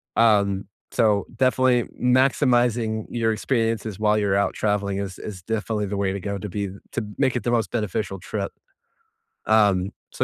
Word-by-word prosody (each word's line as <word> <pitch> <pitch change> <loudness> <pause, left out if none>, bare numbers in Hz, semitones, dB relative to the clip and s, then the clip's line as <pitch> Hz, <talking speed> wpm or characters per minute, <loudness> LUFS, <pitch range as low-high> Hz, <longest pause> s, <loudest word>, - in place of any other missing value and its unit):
Um, 100 -3 +3 0.3
so 105 -4 +2
definitely 130 -1 +3 0.2
maximizing 120 -3 +2
your 115 -2 0
experiences 115 -3 -1
while 105 0 +3
you're 100 -2 +1
out 100 0 +1
traveling 100 -2 -1
is 95 -2 -5
is 100 -4 -7
definitely 110 +1 -2
the 100 - -3
way 100 -1 0
to 100 - -3
go 100 +1 -3
to 100 - -6
be 100 +1 -3 0.2
to 115 - -1
make 130 -3 +2
it 125 - -1
the 120 - 0
most 115 -2 +1
beneficial 105 -3 -2
trip. 100 +1 -4 0.9
Um 100 -4 +3 0.2
so - - -1
105 Hz, 165 wpm, -24 LUFS, 100-115 Hz, 0.9 s, Um